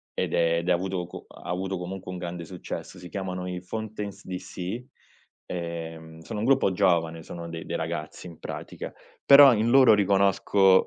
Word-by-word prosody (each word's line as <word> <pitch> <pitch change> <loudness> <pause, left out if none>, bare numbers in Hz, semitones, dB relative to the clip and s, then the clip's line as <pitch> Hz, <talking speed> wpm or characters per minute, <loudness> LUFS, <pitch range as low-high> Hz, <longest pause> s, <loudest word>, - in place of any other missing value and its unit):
ed - - -1
è 85 0 +3
ed 85 +2 -2
avuto 90 0 0
co 90 - -10
ha - - -13
avuto 95 +2 -2
comunque 90 +1 -6
un 90 - -5
grande 85 -1 -5
successo. 90 +1 -7
Si 90 0 -10
chiamano 90 -2 -4
i 90 -1 -4
Fontaines 105 +1 -6
DC, 95 +4 -5 0.6
ehm, 80 -2 -6
sono 105 +6 -5
un - - -1
gruppo 135 -6 +4
giovane, 85 -3 +2
sono 85 +1 -7
dei 85 0 -6
dei - - -3
ragazzi, 80 +1 -5
in 85 -2 -10
pratica, - - -7 0.3
però 140 -2 +9
in 110 +2 +1
loro 130 -3 +7
riconosco, 100 -1 +4
90 Hz, 170 wpm, -26 LUFS, 85-100 Hz, 0.6 s, però